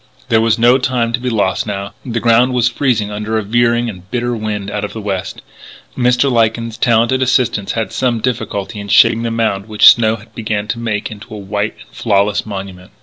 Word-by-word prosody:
There 110 -1 +3
was 115 -1 +2
no 120 +3 +4
time 120 -3 -1
to 120 - +1
be 125 0 -2
lost 105 -3 0
now; 100 -1 -4
the 120 -2 -3
ground 120 +2 +3
was 120 -1 +3
freezing 120 -4 0
under 105 +1 -2
a 110 - -1
veering 120 +2 +1
and 95 -4 -9
bitter 120 0 -2
wind 105 -2 -4
out 105 - -3
of 105 - -5
the 110 - -6
west. 100 -3 -4 0.5
Mr. 125 +1 +2
Lyken's 115 -1 0
talented 120 +2 +2
assistants 125 -5 +1
had 115 -1 -3
some 125 -3 0
difficulty 110 -3 -3
in 100 - -7
shaping 115 +3 +5
the 115 - -2
mound 110 -3 -1
which 105 -1 +7
snow 110 -2 -1
began 105 -2 -3
to 115 - -2
make 110 -3 -3
into 105 0 -10
a - - -7
white 105 +2 -3
and - - -16
flawless 100 -1 +1
monument. 95 -2 -7
110 Hz, 205 wpm, -16 LUFS, 105-120 Hz, 0.5 s, which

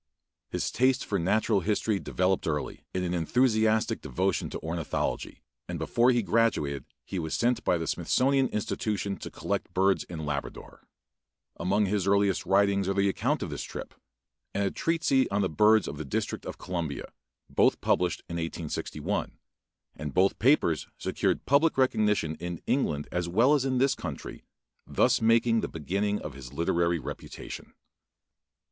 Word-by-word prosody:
His - - -2
taste 130 +1 +2
for 100 - -1
natural 105 +4 +2
history 105 +2 0
developed 95 0 0
early 75 -2 -3
in 90 - -2
an 90 -1 -1
enthusiastic 110 +4 +2
devotion 90 +8 -1
to - - -5
ornithology, 80 0 -3 0.3
and - - -3
before 120 +1 +2
he 120 -2 +3
graduated 95 - +1 0.2
he 95 - -4
was 80 -2 -2
sent 120 +1 +1
by 90 - +2
the 80 - -3
Smithsonian 135 +7 +2
Institution 105 -2 -2
to - - -7
collect - - -3
birds 95 +1 +3
in 80 -3 -6
Labrador. 70 -1 -6 0.7
Among 100 +3 +1
his 100 -1 0
earliest 100 -2 +2
writings 100 0 +3
are 100 - 0
the 100 0 +3
account - - 0
of - - -5
this - - -4
trip, - - -7 0.6
and 100 - +1
a 100 - 0
treatise 160 -5 +1
on 100 +1 +1
the 95 - +1
birds 105 +7 +4
of 75 - -5
the - - -3
District 70 - -3
of - - -6
Columbia, 85 -6 -4 0.4
both - - +3
published 90 - +1
in 85 - -4
1861, 80 -1 -3 0.6
and 75 -2 -6
both 95 +2 +3
papers 115 - +3
secured - - -1
public 145 +3 +3
recognition 105 - +2
in 85 0 -5
England 75 - 0
as 90 -1 -1
well 115 +11 +4
as 140 -3 +2
in 130 -1 +1
this 135 +2 +3
country, 80 - -7 0.4
thus - - +2
making 115 0 +3
a - - 0
beginning 100 +6 -1
of 75 - -6
his 65 -2 -10
literary 85 +1 +1
reputation. 70 - -8
100 Hz, 160 wpm, -28 LUFS, 85-115 Hz, 0.7 s, birds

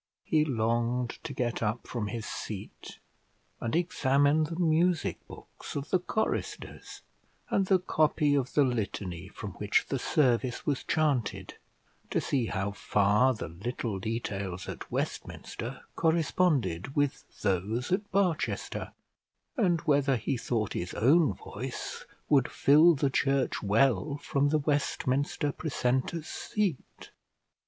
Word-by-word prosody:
He 155 -1 +3
longed 120 -1 0
to - - -4
get 120 -3 -2
up 110 +2 -1
from 115 -4 -3
his 115 0 -4
seat, 105 -1 -7 0.6
and 115 +3 -2
examine 145 -2 +3
the 165 +2 -5
music 170 0 +2
books - - -10
of 145 +1 -4
the 185 - +4
choristers, 220 +5 -3 0.5
and 195 -1 +2
the 190 - +5
copy 155 -4 +2
of 135 -3 0
the 145 - +6
litany 100 -8 -2
from 100 +1 -7
which 105 0 +2
the 135 - -1
service 125 -4 +1
was 140 -3 0
chanted, 145 -8 0 0.6
to - - +1
see 130 -5 0
how 100 +1 -2
far 105 +5 +3
the 110 - -6
little 105 +3 -4
details 100 -4 -3
at - - -7
Westminster - - -4
corresponded 160 - +1
with 145 -2 +1 0.2
those 105 - 0
at 200 +2 0
Barchester, 185 -5 -1 0.6
and 180 - +2
whether 140 -2 +3
he 120 +3 -1
thought 115 -3 -1
his 85 - -4
own 140 - +4
voice - - -6 0.2
would 140 -4 +4
fill 155 +4 +6
the 135 -1 +1
church 135 0 +1
well 120 +6 +2
from 145 0 0
the 155 - +3
Westminster 145 0 0
precentor's 140 +1 -1
seat. 200 -10 -3
135 Hz, 130 wpm, -29 LUFS, 115-155 Hz, 0.6 s, the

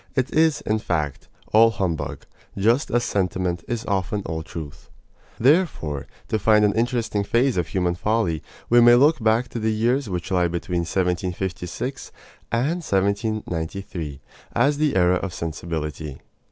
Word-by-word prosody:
It 130 -2 0
is, 160 -1 +3
in 110 +1 0
fact, 75 -8 -2 0.3
all 115 +1 +7
humbug, 95 -7 -3 0.3
just 115 +8 +2
as 120 0 +1
sentiment 90 -5 -1
is 120 -2 -3
often 100 +1 -1
all 80 -1 -3
truth. 80 -2 -9 0.5
Therefore, 125 - +2 0.2
to 110 - 0
find 105 0 +4
an 100 - +2
interesting 115 -2 0
phase 120 +5 +2
of 85 -3 0
human 90 0 0
folly, 90 -4 0 0.3
we 120 0 +6
may 120 0 +8
look 145 +5 +4
back 115 +3 +3
to 120 - -4
the 110 0 +1
years 115 +3 +1
which 90 0 -4
lie 90 -2 +3
between 85 +1 -2
1756 90 0 -2 0.4
and 140 +10 0
1793 95 - -2 0.3
as 140 +5 +2
the 150 -2 +2
era 90 0 +4
of 90 -1 -5
sensibility. 80 -3 -4
100 Hz, 145 wpm, -23 LUFS, 85-115 Hz, 0.5 s, may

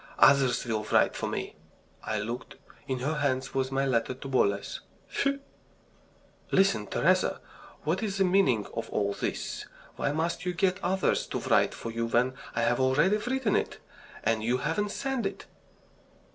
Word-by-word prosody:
Others 135 -3 +5
will 110 -3 -1
write - - +3
for - - -2
me." - - -4 0.5
I 110 - -2
looked. 120 +4 -5 0.3
In 130 - -1
her 150 +4 -1
hand 135 -2 0
was 130 0 0
my 135 +1 +1
letter 125 -1 0
to 135 +2 -8
Boles. 100 -7 +1 0.3
Phew! 275 0 0 1.1
"Listen, 190 - +3
Teresa! - - +2 0.4
What 165 +6 0
is 200 -3 -2
the 195 - +4
meaning 180 - +3
of 115 0 -4
all 100 -1 0
this? - - -4 0.3
Why - - 0
must 160 +3 -1
you 180 -1 -2
get 185 0 +1
others 185 +2 +1
to - - -3
write - - +2
for 115 - -6
you 115 0 -2
when 120 +3 +2 0.2
I 115 - +1
have 120 +2 +2
already 145 +10 +3
written 245 0 0
it, - - -1 0.5
and 110 0 +1
you 120 +3 +2
haven't 210 +10 -1
sent 270 +3 -1
it?" - - -8
135 Hz, 165 wpm, -29 LUFS, 115-190 Hz, 1.1 s, Others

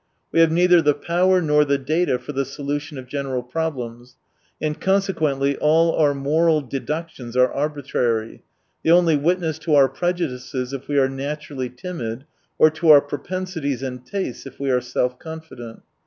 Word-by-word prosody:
We - - +2
have 165 -1 +5
neither 175 +1 +5
the 150 -2 +3
power 180 +4 +2
nor 150 -1 +4
the 140 -1 +1
data 150 +1 0
for 125 +3 -8
the 140 -1 -1
solution 145 +2 -5
of 130 - -7
general 130 -1 -3
problems, 125 -4 -5 0.4
and 150 0 -3
consequently 155 -8 +1
all 165 +2 +3
our 145 -3 +3
moral 155 +3 +2
deductions 135 -2 -5
are 125 0 +4
arbitrary, 135 -6 -2 0.4
they - - +1
only 170 -2 +5
witness 160 +1 0
to 160 -2 +1
our 140 -2 +6
prejudices 135 -5 -3
if 135 0 -6
we 145 - -1
are 135 -1 +4
naturally 135 -1 -5
timid, 125 -4 -6 0.3
or 155 - +6
to 160 +1 0
our 145 -2 +9
pro 145 0 -5
pensities 165 -8 -4
and 125 -2 -5
tastes 165 -4 -5
if 130 - -13
we 140 -1 0
are 125 -1 +2
self 125 +1 -2
confident. 160 -8 -9
145 Hz, 170 wpm, -22 LUFS, 130-160 Hz, 0.4 s, our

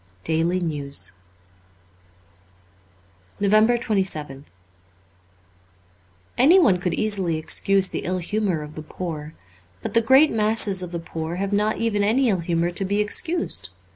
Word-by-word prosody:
' 90 0 -34
Daily 165 +3 0
NtwsJ 145 -5 -3 2.3
366 - - -29
NOVEMBER 215 +4 +3
27th 175 - -1 2.0
ANYONE 275 - +5
could 175 -2 -2
easily 195 -6 0
excuse 195 +4 +2
the - - -4
ill 185 +1 -1
humour 185 -3 -2
of 150 0 -11
the 155 - -8
poor. 155 -1 -7 0.5
But 230 0 +1
great 265 +6 +5
masses 215 -3 +1
of 180 -1 -7
the 175 - -4
poor 165 0 -6
have 195 +2 -3
not 210 +1 0
even 225 -3 -1
any 240 +5 +2
ill 190 -4 0
humour 170 0 -1
to 185 - 0
be 200 +2 -1
excused. 330 - +1
190 Hz, 135 wpm, -22 LUFS, 165-215 Hz, 2.3 s, ANYONE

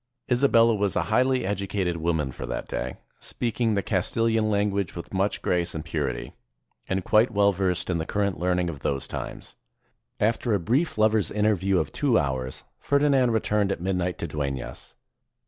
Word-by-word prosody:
Isabella 115 -2 +5
was 100 -2 0
a - - +2
highly 130 +1 +3
educated 95 -2 -1
woman 80 -4 -1
for - - -7
that - - -4
day, 65 0 -4 0.2
speaking 115 -2 -1
the 100 - 0
Castilian 110 +3 +1
language 100 -3 0
with 85 - -8
much 95 +2 0
grace 90 -1 0
and 80 0 -5
purity, 70 -7 -3 0.6
and 95 0 0
quite 110 +3 +4
well 100 -1 +3
versed 90 -2 -1
in 90 -2 0
the 80 - -2
current 100 -4 -1
learning 90 0 +1
of 80 -4 -5
those 70 0 -2
times. - - -7 0.7
After 110 +1 +1
a - - +1
brief 125 - 0
lover's 110 -1 +3
interview 100 -3 +1
of - - -1
two 135 -6 +2
hours, 65 -4 -2 0.2
Ferdinand 140 -3 +3
returned 105 -3 +1
at - - -2
midnight 90 0 -1
to 85 - -4
Deunas. 70 -3 -5
100 Hz, 165 wpm, -26 LUFS, 85-110 Hz, 0.7 s, Isabella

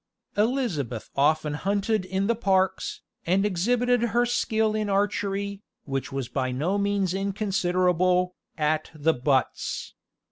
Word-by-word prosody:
Elizabeth 205 - -1
often 150 +1 +2
hunted 200 +4 0
in 190 +1 -1
the 230 - +3
parks, 190 -4 0 0.3
and 190 +3 +3
exhibited 240 +6 +2
her 235 +1 +2
skill 220 -3 +1
in 215 -1 -1
archery, 200 0 -1 0.2
which 135 -1 -3
was 135 -2 -3
by 130 -1 -2
no 165 +11 0
means 200 -2 +1
inconsiderable, 185 -2 +1 0.2
at 155 0 0
the 155 +2 +2
butts. 130 +1 -1
190 Hz, 120 wpm, -26 LUFS, 155-205 Hz, 0.3 s, the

